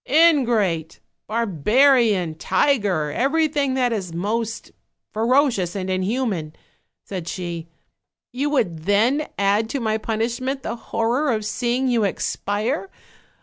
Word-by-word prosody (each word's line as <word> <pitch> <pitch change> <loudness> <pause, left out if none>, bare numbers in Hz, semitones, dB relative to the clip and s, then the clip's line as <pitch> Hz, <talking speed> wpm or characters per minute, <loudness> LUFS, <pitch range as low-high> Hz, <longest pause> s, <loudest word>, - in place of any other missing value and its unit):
'Ingrate! 235 - +3 0.3
barbarian! 220 - +3
tiger! 190 - +1
everything 285 - +1
that 250 -2 +1
is 190 -6 -3
most 220 +6 -3 0.4
fero 255 +7 +3
cious 180 -5 -3
and 190 -1 -3
inhuman!' 185 -4 -1 0.5
said 185 -4 -6
she; 170 -2 -5 0.6
'you 275 +3 -1
would 175 - -1
then 230 +10 +2
add 205 +3 +2
to 275 - -2
my 220 -2 0
punishment 235 +5 -2
the - - -3
horror 240 +6 +1
of 215 -2 -1
seeing 245 +4 -1
you 235 -3 +2
expire? 210 - -2
225 Hz, 115 wpm, -22 LUFS, 190-260 Hz, 0.6 s, Ingrate